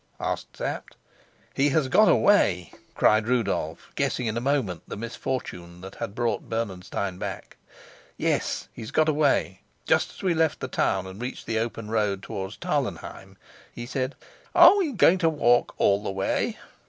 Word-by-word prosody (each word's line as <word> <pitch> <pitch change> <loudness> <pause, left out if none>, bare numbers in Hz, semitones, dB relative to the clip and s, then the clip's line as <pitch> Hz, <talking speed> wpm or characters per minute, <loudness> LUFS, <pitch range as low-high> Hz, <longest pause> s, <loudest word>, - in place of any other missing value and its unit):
asked - - -4
Sapt. - - -4 0.6
"He 140 +2 +2
has 140 -1 +1
got 210 +10 +5
away?" 95 - +3 0.2
cried 110 0 +3
Rudolf, 100 -10 -1
guessing 125 - -1
in 110 -1 -1
a 115 - -1
moment 125 - 0
the - - -6
misfortune 100 -7 -5
that 95 +1 -9
had 100 - -6
brought 120 -1 -1
Bernenstein 95 -4 -3
back. - - -6 0.6
"Yes, - - -1
he's 110 - -8
got 155 0 +2
away. 150 -2 +1 0.2
Just - - +2
as - - -13
we 185 -2 +2
left 160 -2 +1
the - - -4
town 95 -1 0
and 95 +3 -9
reached 125 +1 -5
the 110 -1 -1
open 115 -1 -4
road 105 -3 0
towards 95 -1 -6
Tarlenheim, - - -4 0.3
he 120 - -7
said, 130 +2 -3 0.4
'Are - - +9
we 355 -7 +1
going 190 -6 +4
to 165 -2 +3
walk 120 -6 +2
all 100 0 +3
the 105 - -4
way? 95 0 -1
115 Hz, 165 wpm, -26 LUFS, 100-140 Hz, 0.6 s, Are